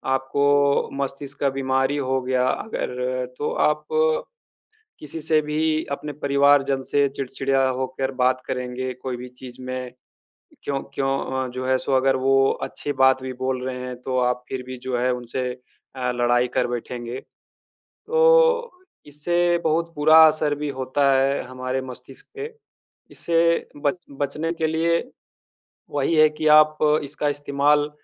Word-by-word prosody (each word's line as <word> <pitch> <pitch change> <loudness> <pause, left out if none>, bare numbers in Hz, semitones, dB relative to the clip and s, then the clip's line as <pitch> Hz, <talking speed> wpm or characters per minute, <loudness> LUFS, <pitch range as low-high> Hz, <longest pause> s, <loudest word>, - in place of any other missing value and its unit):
आपको 140 +1 +2
मस्तिष्क 140 +1 -6
का 140 - +2
बीमारी 135 +1 0
हो 130 -1 0
गया 125 0 +1
अगर, 125 - -3
तो 150 - -2
आप 150 0 +1 1.1
किसी 150 +2 -8
से 155 0 +2
भी, 155 +1 0
अपने 145 +1 -4
परिवार 140 0 +3
जन 135 -1 -1
से 140 +1 +2
चिड़चिड़ा 135 0 -1
होकर 130 +1 -2
बात 130 0 +2
करेंगे, 125 0 -4
कोई 125 0 -5
भी 125 - -8
चीज़ 130 0 -10
में, 130 -1 -5 0.7
क्यों 140 -1 -2
क्यों 135 -1 0 0.4
अ, - - -6
जो 130 0 -4
है, 130 0 +3
सो 135 - -4
अगर 135 0 +3
वो 135 +1 +2 0.3
अच्छी 145 - -4
बात 130 0 +5
भी 130 0 -4
बोल 130 -1 -1
रहे 130 -1 -3
हैं, 125 0 -6
तो 130 -1 -1
आप 125 0 0
फ़िर 130 -1 -4
भी 130 0 -6
जो 130 - -1
है, 125 +1 +1
उनसे 125 +1 -4 0.5
अ, 125 -1 -1
लड़ाई 120 0 +2
कर 125 - +3
बैठेंगे। 120 +1 -5 0.7
तो 480 0 +3 0.3
इससे 175 +4 0
बहुत 165 +1 0
बुरा 155 +2 +6
असर 150 -1 +1
भी 150 0 -4
होता 135 +2 +2
है 135 +1 +2
हमारे 130 +1 -4
मस्तिष्क 130 +1 -11
पे। 440 +2 -6 0.6
इससे 170 0 +1 0.2
बच 145 +4 +2 0.2
बचने 150 +4 -2
के 160 - 0
लिए 165 +1 +1 0.9
वही 145 +3 0
है 155 0 +7
कि 155 - -3
आप 155 0 +1 0.3
इसका 145 +1 -3
इस्तेमाल 145 +1 +1
135 Hz, 150 wpm, -23 LUFS, 130-150 Hz, 1.1 s, है